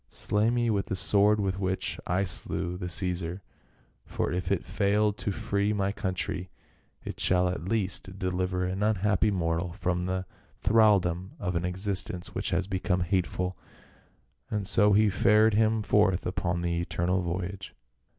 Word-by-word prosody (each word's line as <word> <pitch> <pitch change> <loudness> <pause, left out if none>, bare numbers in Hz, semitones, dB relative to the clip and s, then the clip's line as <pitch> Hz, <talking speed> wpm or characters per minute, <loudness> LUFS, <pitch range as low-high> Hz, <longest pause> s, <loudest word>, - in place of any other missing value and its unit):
" - - -42 0.2
Slay 105 +2 +2
me 120 -1 +1
with 100 -2 0
the - - -2
sword 105 +2 +4
with 95 -1 -1
which 95 -1 -2
I 90 +3 +1
slew 85 0 -2
the 90 0 -5
Ceesar; 90 0 -1 0.6
for - - -2
if 90 +1 -2
it 100 - 0
failed 100 +3 +1
to 105 - -2
free 100 +2 0
my 100 -1 0
country, 95 -2 -3 0.5
it - - -7
shall 90 0 +3
at 90 -2 -3
least 95 -2 -2
deliver 90 0 -1
an 95 +2 -2
unhappy 105 0 +2
mortal 85 -2 -1
from 90 -2 -1
the 95 +1 -2 0.3
thraldom 95 -5 +3
of 90 -3 -2
an 85 +1 0
existence 90 -1 -3
which - - -2
has 90 +1 +1
become 95 -1 -1
hateful." 90 0 -1 0.9
And 105 -2 -2
so 105 0 +4
he 105 0 +4
fared 105 +3 +4
him 110 0 +2
forth 105 -3 +2
upon 90 -1 -1
the 85 -1 0
eternal 90 +2 0
voyage. 95 +2 -4
95 Hz, 160 wpm, -28 LUFS, 90-105 Hz, 0.9 s, sword